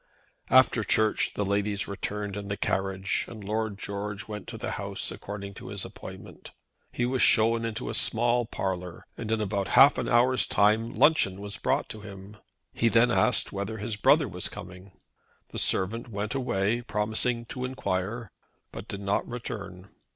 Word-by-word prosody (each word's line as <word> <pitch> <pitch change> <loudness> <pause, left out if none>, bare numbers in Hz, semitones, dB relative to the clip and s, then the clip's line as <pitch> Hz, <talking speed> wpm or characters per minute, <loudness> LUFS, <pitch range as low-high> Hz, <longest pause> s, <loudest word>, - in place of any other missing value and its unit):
After - - +5
Church 110 -1 +2
the 105 - 0
ladies 100 0 0
returned 100 0 -4
in 100 -1 -5
the 100 0 -3
carriage, 95 0 0
and 110 -3 -9
Lord 110 0 -2
George 100 0 -5
went 105 -2 -7
to - - -6
the - - -4
house - - -3
according 100 -1 -7
to - - -9
his - - -3
appointment. - - -10 0.4
He 120 - -1
was 130 0 0
shown 115 +2 +4
into 115 +2 -4
a - - -3
small 120 +1 +2
parlour, 90 -4 -4
and 110 -2 -5
in 110 - +1
about 100 -2 -1
half 140 +2 +8
an 120 -2 -2
hour's 125 +2 +4
time 110 +3 +3
luncheon 100 -12 +3
was 100 0 -5
brought - - 0
to 110 - -8
him. 100 0 -10 0.4
He 115 - +2
then 120 +2 +4
asked 125 +1 +3
whether 100 +3 -4
his 105 +1 -3
brother 105 - +4
was - - -3
coming. 90 +2 -10 0.6
The - - -3
servant 115 +6 +1
went 105 -1 -3
away, 115 -3 0
promising 115 +2 -1
to 125 - -5
enquire, 115 -3 -3 0.4
but 100 - -8
did 100 -2 -6
not 100 0 0
return. 100 -6 -7
105 Hz, 170 wpm, -28 LUFS, 100-115 Hz, 0.6 s, half